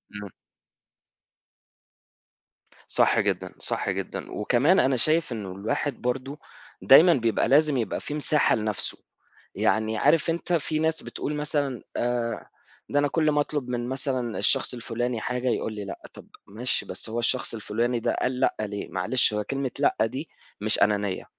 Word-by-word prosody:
امم. 105 -1 -7 2.6
صح - - +3
جدًا، - - -1
صح - - -1
جدًا، - - -5
وكمان 130 - +2
أنا 130 0 +2
شايف 155 +3 +1
إنه 105 -5 -5
الواحد 120 +8 -3
برضه 135 +4 -3 0.4
دايمًا 165 +6 +7
بيبقى 115 -7 +1
لازم 150 0 +4
يبقى 115 - -2
في - - -6
مساحة 150 0 +2
لنفْسه، 105 -2 -2 0.6
يعني 110 0 +1
عارف 150 +8 +3
أنت 170 +1 -2
في 155 -1 0
ناس 160 0 0
بتقول 150 - -5
مثلًا 145 -4 -1 0.2
آآ 120 -1 -2 0.4
ده 145 - +2
أنا 145 - +2
كلّ 155 0 +1
ما 150 - +2
أطلب 145 -3 -3
من 120 0 -3
مثلًا 130 -3 -2
الشخص - - +3
الفلاني 120 -1 -3
حاجة 125 +1 -2
يقول 110 - -2
لي 105 -1 -6
لأ، 100 - -8
طب - - -13 0.2
ماشي 120 +5 -1
بس - - -1
هو 115 +2 -2
الشخص 120 +1 +1
الفلاني 115 +2 -1
ده - - -1
قال 125 0 -1
لأ - - +2
ليه، 105 -1 -4
معلش 105 +6 +2
هو 105 0 -1
كلمة 135 +1 -3
لأ 145 - +2
دي 130 +7 -6 0.3
مش 110 +1 +4
أنانية، 100 -2 0
125 Hz, 155 wpm, -25 LUFS, 110-145 Hz, 2.6 s, دايمًا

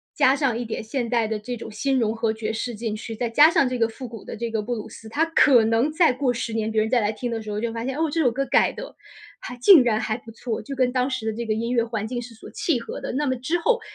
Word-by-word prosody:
加 275 -2 +4
上 270 -5 0
一 245 - -3
点 220 - -4
现 235 +2 -3
代 235 -2 +2
的 220 -1 -2
这 245 +4 -5
种 225 -1 -8
新 265 +6 0
融 225 -3 +1
合 225 -1 -1
爵 220 0 -3
士 230 +2 -4
进 220 0 -3
去， 225 +1 -6
再 235 +1 -2
加 295 +7 +7
上 325 -7 +2
这 250 -1 -3
个 230 - +3
复 255 +4 -9
古 225 -3 -10
的 - - -7
这 230 +1 -4
个 220 -1 -1
布 240 +3 -3
鲁 215 - -7
斯， 225 - -12
它 290 +9 0
可 285 -7 +5
能 225 +5 +2
再 330 -2 +4
过 255 0 0
10 235 -1 -4
年， 220 -1 -1
别 220 0 +2
人 220 - -1
再 245 0 +3
来 210 - 0
听 240 +3 -4
的 225 -1 -3
时 215 - -8
候 210 0 -3
就 235 0 -2
发 230 +1 -5
现， 265 +1 -3
哦， 320 0 +1
这 330 - -1
首 260 - +4
歌 275 +4 -2
改 - - +3
得 - - -8 0.5
还 250 - -7
竟 305 +6 +8
然 220 -3 +1
还 220 +1 -2
不 230 -1 -14
错， 225 0 -4
就 280 - -7
跟 255 -1 +2
当 255 +1 0
时 260 -4 -3
的 220 - 0
这 235 +2 -4
个 220 - 0
音 230 +2 -2
乐 235 -2 +2
环 225 -2 -3
境 240 +2 -4
是 235 -1 -11
所 - - -12
契 305 -8 0
合 - - -7
的。 - - -5
那 290 +3 0
么 260 -1 0
之 285 +8 -1
后， 480 +7 +2
235 Hz, 335 characters per minute, -23 LUFS, 220-260 Hz, 0.5 s, 竟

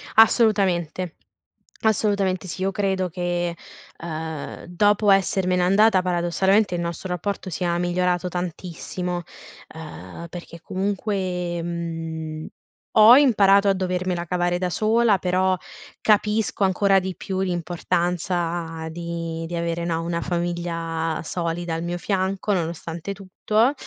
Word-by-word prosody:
Assolutamente. 190 -7 +3 0.7
Assolutamente 200 -4 +1
sì. 185 - -5
Io 195 +1 +1
credo 190 -2 0
che, 175 0 -2 0.4
ehm, 160 -2 -6
dopo 205 +3 +3
essermene 185 -1 +2
andata 195 +1 +4
paradossalmente 180 +3 +2
il 175 - -1
nostro 170 +2 -4
rapporto 185 +2 -3
sia 175 0 -1
migliorato 180 0 0
tantissimo, 180 0 -4 0.5
ehm, 90 - -9
perchè 170 -1 -9
comunque, 185 -3 -2
mhmm, 165 -2 -4 0.5
ho 220 +3 +9
imparato 200 -7 +5
a 195 - +4
dovermela 185 -1 -1
cavare 175 0 0
da 180 0 -1
sola 215 +1 +3
però 185 +1 +1 0.4
capisco 210 -1 +2
ancora 195 +1 +3
di 190 0 -3
più 190 +2 -4
l'importanza 175 -1 -1
di 165 0 -4
di 170 - -6
avere, 170 0 -2
no, 165 -1 -1
una 170 0 -2
famiglia 170 -2 -2
solida 170 0 -3
al 165 +1 -3
mio 175 0 -2
fianco, 195 +2 -1
nonostante 170 0 -3
tutto. 210 +6 +1
180 Hz, 115 wpm, -23 LUFS, 170-195 Hz, 0.7 s, ho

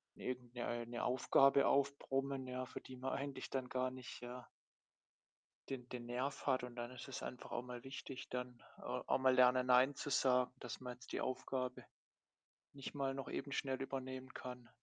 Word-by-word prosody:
irgend 125 -1 -4
'ne 120 - -3
äh, 120 0 -1
'ne 120 0 -3
Aufgabe 135 +2 +6
aufbrummen, 135 -1 +1
ja, 130 0 -2
für 130 - -7
die 130 - -9
man 130 +1 -2
eigentlich 140 0 -3
dann 130 -2 -1
gar 130 0 +1
nicht, 125 -2 -8
ja 125 0 -7 1.2
den 125 -2 -4
den 120 -1 -5
Nerv 130 +5 -2
hat. 130 -2 +3
Und 125 -1 -6
dann 120 0 -3
ist 125 -1 -8
es 135 - -4
einfach 125 - -6
auch 120 - 0
mal 125 0 -7
wichtig, 135 0 -6
dann 125 -1 -4 0.2
auch - - 0
mal 130 0 +5
lernen, 125 0 +6
Nein 125 +3 +6
zu 145 - -4
sagen, 125 -2 +4
dass 125 - -6
man 125 -1 -4
jetzt 125 - -12
die - - 0
Aufgabe 130 0 -2 0.9
nicht 140 +1 -6
mal 135 -1 +1
noch 135 0 -4
eben 140 - -3
schnell 135 -1 0
übernehmen 130 -1 -4
kann. 125 -1 -7
130 Hz, 185 wpm, -39 LUFS, 125-135 Hz, 1.2 s, Aufgabe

